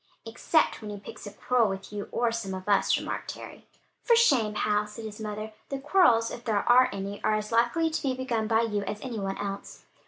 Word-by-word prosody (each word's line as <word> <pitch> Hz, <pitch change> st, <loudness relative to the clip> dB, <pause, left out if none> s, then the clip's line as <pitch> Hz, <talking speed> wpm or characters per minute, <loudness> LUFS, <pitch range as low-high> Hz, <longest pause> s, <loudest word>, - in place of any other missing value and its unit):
"Except 245 Hz, +8 st, +1 dB
when 215 Hz, -, -7 dB
he 205 Hz, -1 st, -6 dB
picks 205 Hz, -, -10 dB
a -, -, -7 dB
quarrel 240 Hz, -2 st, +1 dB
with 195 Hz, +1 st, -6 dB
you 205 Hz, -1 st, -5 dB
or 235 Hz, -1 st, +1 dB
some 210 Hz, -5 st, -4 dB
of 185 Hz, +1 st, -8 dB
us," 205 Hz, -, +3 dB
remarked -, -, -4 dB
Harry. -, -, -11 dB, 0.3 s
"For 470 Hz, -, +4 dB
shame, 255 Hz, -, +3 dB
Hal!" 210 Hz, 0 st, +1 dB
said 220 Hz, +2 st, -9 dB
his 215 Hz, 0 st, -8 dB
mother. 215 Hz, 0 st, -5 dB, 0.2 s
"The 275 Hz, -, -3 dB
quarrels, 270 Hz, -6 st, +3 dB
if 240 Hz, -, -8 dB
there 215 Hz, -4 st, 0 dB
are 255 Hz, +1 st, +6 dB
any, 200 Hz, +1 st, -6 dB
are 215 Hz, -, +2 dB
as 215 Hz, +1 st, -3 dB
likely 240 Hz, +8 st, +2 dB
to 315 Hz, -, -2 dB
be 265 Hz, -2 st, -1 dB
begun 240 Hz, -4 st, -2 dB
by 225 Hz, 0 st, +3 dB
you, 210 Hz, -3 st, -1 dB
as 210 Hz, -, -4 dB
any 245 Hz, -4 st, -5 dB
one 195 Hz, -1 st, -3 dB
else." 200 Hz, -1 st, -6 dB
220 Hz, 225 wpm, -27 LUFS, 205-245 Hz, 0.3 s, are